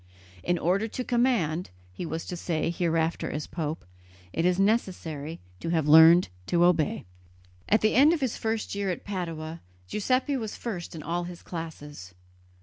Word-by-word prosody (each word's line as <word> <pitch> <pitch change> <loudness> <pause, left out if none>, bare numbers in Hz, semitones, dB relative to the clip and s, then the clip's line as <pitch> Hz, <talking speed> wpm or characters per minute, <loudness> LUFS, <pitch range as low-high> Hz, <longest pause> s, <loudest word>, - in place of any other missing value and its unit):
"In 175 - 0
order 190 +6 +1
to 250 +3 -4
command," 235 -10 +1 0.2
he 165 - -5
was 160 +1 -4
to 180 - -5
say 165 -1 -1
hereafter 165 -1 0
as 150 0 -4
pope, 155 - -4 0.5
"it 165 - 0
is 180 +1 +2
necessary 175 -7 -1 0.2
to - - -4
have 160 -3 +1
learned 160 +3 +8 0.2
to 175 0 +3
obey." 170 -4 +2 0.6
At 215 - +4
the 215 - +3
end 285 +5 +6
of 335 - +1
his 260 -4 0
first 225 -1 -2
year 200 -1 -1
at 180 - -3
Padua, 165 -4 -5 0.3
Giuseppe 255 - 0
was 220 -4 -4
first 180 -8 -5
in 155 - -7
all 175 +2 -2
his 175 -1 -9
classes. 150 - -8
175 Hz, 165 wpm, -27 LUFS, 160-210 Hz, 0.6 s, learned